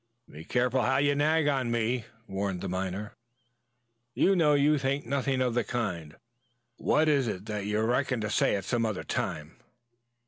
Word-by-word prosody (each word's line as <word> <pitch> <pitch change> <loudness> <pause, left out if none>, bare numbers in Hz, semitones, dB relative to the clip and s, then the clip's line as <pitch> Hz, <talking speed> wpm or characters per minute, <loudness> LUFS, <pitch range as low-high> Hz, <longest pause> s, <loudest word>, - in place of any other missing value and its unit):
"Be 75 - -11
careful 125 +1 +1
how 130 +2 +2
you 145 +1 +3
nag 155 +2 +2 0.2
me 120 +1 0
on," 115 -1 -15 0.2
warned 95 -1 -3
the - - -3
miner. 95 +3 -4 1.0
"You 195 - +3
know 150 -4 +4
you 145 +1 +3
think 135 +2 -1
nothing 135 +1 0
of 125 -2 +1
the 120 0 +1
kind. 90 -10 -4 0.6
What 155 +1 +2
is 140 -5 +3
it 100 -2 -4
that 105 -2 -4
you 105 +1 0
reckon 125 +2 +1
to 105 0 -2
say - - +2
at 100 -2 -4
some 120 +1 0
other 110 -4 -2
time?" 75 +1 -4
120 Hz, 175 wpm, -28 LUFS, 100-140 Hz, 1.0 s, know